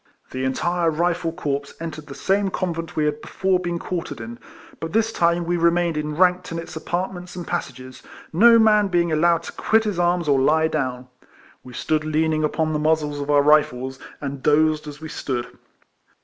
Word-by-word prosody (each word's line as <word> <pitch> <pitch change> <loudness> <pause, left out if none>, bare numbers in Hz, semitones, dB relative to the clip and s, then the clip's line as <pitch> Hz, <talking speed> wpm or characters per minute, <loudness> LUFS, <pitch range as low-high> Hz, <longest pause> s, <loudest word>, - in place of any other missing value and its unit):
The 130 0 -3
entire 170 +5 0
Kifle 170 +1 0
corps 140 -4 -3
entered 160 -2 -7
the 140 - -9
same 195 +1 +1
convent 170 -3 -4
we 155 - +1
had 150 0 -1
before 190 -1 0
been 175 -1 -3
quartered 170 -8 -5
in; 115 +1 -8 0.4
but 165 +1 -5
this 225 +1 +1
time 170 0 +1
we 175 +1 0
remained 170 0 +2
enranked 180 +4 +1
in 165 - -3
its 165 +1 -7
apartments 180 +2 -4
and 175 -2 -6
passages, 130 -3 -5 0.3
no 230 +7 +7
man 210 -2 +4
being 175 -3 +1
allowed 170 +2 +2
to - - -7
quit 220 0 +2
his 205 -5 -2
arms 175 -1 +1
or 140 -2 +3
lie 160 +3 +3
down. 130 -4 -3 0.6
We 125 - -12
stood 155 +4 -1
leaning 155 0 0
upon 155 +1 0
the 150 - 0
muzzles 150 -1 0
of 140 0 -5
our 145 -1 +4
Kifles, 130 -3 +2 0.2
and 140 -2 -5
dozed 155 +1 +2
as 150 +1 -9
we 160 - -6
stood. 125 -5 -5
160 Hz, 185 wpm, -22 LUFS, 150-175 Hz, 0.6 s, no